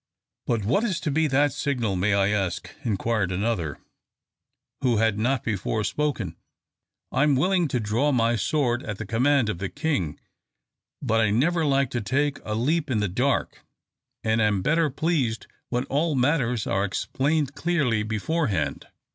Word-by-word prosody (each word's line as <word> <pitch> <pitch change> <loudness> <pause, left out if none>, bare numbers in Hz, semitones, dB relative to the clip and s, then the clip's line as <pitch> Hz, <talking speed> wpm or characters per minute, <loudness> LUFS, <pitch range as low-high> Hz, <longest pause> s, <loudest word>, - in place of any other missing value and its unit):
"But 115 -4 0
what 195 - +2
is 200 -7 0
to 155 - -1
be 160 +2 +2
that 145 0 +2
signal, 120 -9 -1
may 100 +3 +2
I 100 0 +3
ask?" 95 -4 -2
inquired 110 -3 0
another, 95 - -1 1.0
who 125 -4 +2
had 110 -1 +2
not 125 +3 +1
before 105 0 -1
spoken. 120 - -2 0.8
"I 130 - +1
am 150 -2 +4
willing 180 +4 +2
to 125 -3 -1
draw 115 +7 +1
my 120 -2 +2
sword 120 +1 0
at 105 -2 -5
the 110 - -5
command 125 +4 +2
of 100 -5 -3
the 95 0 -3
King, 145 - -2 0.8
but 115 -3 +2
I 110 - +3
never 160 +10 +2
like 135 -2 +2
to 120 - -1
take 140 +7 0
a 105 - -3
leap 150 +7 0
in 115 -4 +1
the 105 - +1
dark, 125 +8 -1 0.6
and 110 0 +2
am 105 -3 +2
better 160 +2 +2
pleased 140 -6 -1 0.2
when 125 0 0
all 150 +2 0
matters 125 -4 +1
are 95 0 0
explained 140 +8 -1
clearly 145 -8 +1
beforehand." 110 - -1
120 Hz, 165 wpm, -25 LUFS, 105-145 Hz, 1.0 s, am